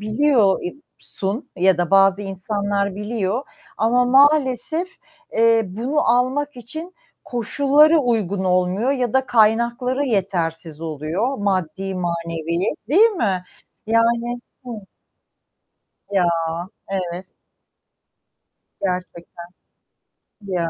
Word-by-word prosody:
biliyor 215 -2 +3
eb 175 - -4 0.2
sun 205 +8 -4
ya 185 -1 +3
da 175 -2 -1
bazı 195 +1 +4
insanlar 200 0 -2
biliyor 210 +2 -2 0.3
ama 245 +3 +2
maalesef, 280 +4 +3 0.4
eee, 230 0 +4
bunu 240 +11 -2
almak 255 +4 +1
için 315 +9 -7 0.3
koşulları 285 +6 +3
uygun 210 - 0
olmuyor 185 +7 +1
ya 250 -5 -1
da 265 0 +2
kaynakları 235 +4 +2
yetersiz 170 - -2
oluyor, 165 - -3
maddi 190 -1 -2
manevi, 170 0 -2
değil 420 - +5
mi? 195 - -1 0.4
Yani, 235 +2 +1 0.2
hı 230 -4 -7 1.3
Ya, 195 -3 +2 0.7
evet. 185 -1 -4 1.5
Gerçekten. 180 -2 -5 1.0
Ya. 180 -4 -2
210 Hz, 95 wpm, -21 LUFS, 185-250 Hz, 1.5 s, değil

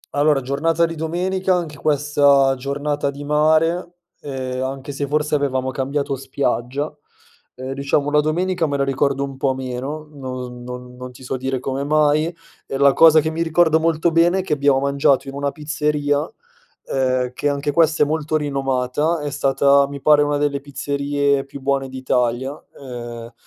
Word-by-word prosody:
Allora, 145 -1 +3
giornata 160 +6 +1
di 165 - -4
domenica 180 +4 -1
anche 165 -4 -3
questa 145 -2 +3
giornata 140 +2 -2
di 140 +1 -7
mare, 160 +4 +2 0.3
ehm, 130 -2 -4
anche 135 +1 -5
se 140 0 -3
forse 150 +1 -1
avevamo 130 -3 0
cambiato 140 +1 -2
spiaggia. 135 +1 -2 0.6
Ehm, 130 +1 -5
diciamo 140 +1 0
la 150 - +4
domenica 175 +2 0
me 140 - -1
la 140 - +1
ricordo 140 0 0
un 135 -1 -6
po' 135 -1 0
meno, 130 +4 -5
non 130 -3 -7
non 125 0 -8
non 125 0 -8
ti 130 +1 -15
so 130 - -3
dire 130 0 -2
come 135 +2 -3
mai 150 +1 +2 0.4
e 135 - -3
la 140 0 +5
cosa 160 -1 +7
che 160 +1 -2
mi 165 +1 -3
ricordo 160 -1 +3
molto 165 +1 +1
bene 170 +3 +3
è - - +1
che 160 - -1
abbiamo 140 -2 +3
mangiato 140 0 +2
in 135 - -6
una 140 0 -1
pizzeria, 150 -1 -1 0.5
ehm, 130 -1 0
che 145 - -1
anche 145 +1 -1
questa 160 0 +3
è - - +2
molto 155 +1 -2
rinomata, 140 +2 -1
è 145 -1 -4
stata 140 +1 +3
mi 140 0 -7
pare 150 +1 +5
una 145 0 +1
delle 145 -1 -1
pizzerie 140 0 -1
più 140 0 -10
buone 135 0 -1
d'Italia, 130 0 -1 0.3
ehm 120 -3 -8
140 Hz, 170 wpm, -20 LUFS, 135-150 Hz, 0.6 s, cosa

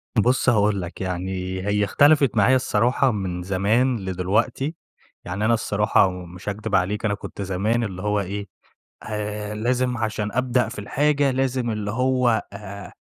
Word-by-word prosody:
بُصّ 125 +3 +3
هاقول 105 -3 +2
لك، 85 +2 -7
يعني 95 0 -3
هي 105 0 +2
اختلفت 140 +3 +4
معايا 120 +6 +5
الصراحة 125 +1 +2
من 90 -4 -3
زمان 110 +7 +1
لدلوقتي، 100 - -1 0.5
يعني 100 +4 -2
أنا 115 - +4
الصراحة 105 -3 +2
ومش 90 +1 -7
هاكدب 105 0 -2
عليك 100 +4 0
أنا 100 - +1
كنت 100 - -7
زمان 100 +5 0
اللي 95 -4 -5
هو 105 0 0
إيه، 100 +1 -4 0.6
آآ، 105 0 -4
لازم 125 +2 0
عشان 110 -2 -2
أبدأ 125 -1 +1
في 115 - -9
الحاجة، 145 +6 +1
لازم 130 -2 0
اللي 105 -2 -3
هو 125 -2 +2
آآ، 100 0 -8
105 Hz, 150 wpm, -23 LUFS, 100-125 Hz, 0.6 s, معايا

